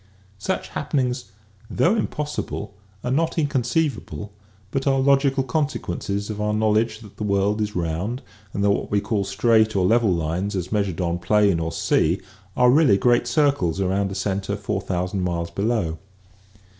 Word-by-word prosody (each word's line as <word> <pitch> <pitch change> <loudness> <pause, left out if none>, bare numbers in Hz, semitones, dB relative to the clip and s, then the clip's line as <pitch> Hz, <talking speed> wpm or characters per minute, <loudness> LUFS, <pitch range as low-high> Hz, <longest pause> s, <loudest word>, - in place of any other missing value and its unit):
Such - - -2
happenings, 125 -3 -1 0.4
though 175 - +2
impossible, 150 - -3 0.3
are 125 - -1
not 165 +5 +1
inconceivable 135 -6 -1 0.4
but 135 0 -1
are 135 -1 +3
logical 135 0 +3
consequences 110 - -2
of 105 0 -5
our 105 0 0
knowledge 110 +1 +1
that 105 -3 -14
the - - -4
world 100 +1 +1
is 105 0 -2
round 90 +8 -2 0.3
and 100 - -2
that 100 - +4
what - - -1
we 105 - +2
call 100 0 -1
straight 110 +1 +2
or 95 -2 +2
level 115 +1 +3
lines 85 +5 -1
as 90 -1 -3
measured 100 -4 0
on 85 0 -1
plain 100 -1 +3
or 80 0 -2
sea 85 +3 +1 0.4
are 125 0 +6
really 140 -8 +5
great 120 +3 +3
circles 120 - +2
around 95 +1 0
a - - -5
center 95 +1 -2
four 100 -1 -3
thousand 90 0 -2
miles 85 -2 -2
below. 100 -5 -1
105 Hz, 160 wpm, -23 LUFS, 95-125 Hz, 0.4 s, are